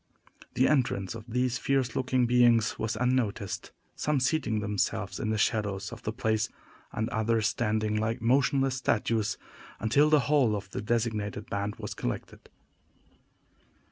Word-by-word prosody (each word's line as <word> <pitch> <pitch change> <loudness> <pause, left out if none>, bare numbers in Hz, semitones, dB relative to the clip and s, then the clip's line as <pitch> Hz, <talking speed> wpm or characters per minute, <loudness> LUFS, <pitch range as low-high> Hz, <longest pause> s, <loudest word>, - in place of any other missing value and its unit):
The 130 - +4
entrance 120 -9 +1
of 115 -1 -9
these 125 +1 0
fierce 135 -4 0
looking 130 -1 +1
beings 120 -2 +3
was 110 +1 -1
unnoticed: 115 -5 -1 0.3
some 150 -2 0
seating 130 -5 +1
themselves 105 -2 -2
in 110 - -2
the 110 - 0
shadows 100 -3 0
of - - -9
the 110 - -3
place, 110 -2 0 0.4
and 110 +1 -2
others 110 -2 +1
standing 110 -1 0
like 110 +1 -1
motionless 135 +2 +2
statues, 110 -4 0 0.4
until 140 +8 +3
the 150 -2 +5
whole 130 -6 +3
of 100 -1 -6
the - - -4
designated 110 -2 -2
band 100 +1 -2
was - - -6
collected. - - -5
115 Hz, 140 wpm, -28 LUFS, 105-125 Hz, 0.4 s, the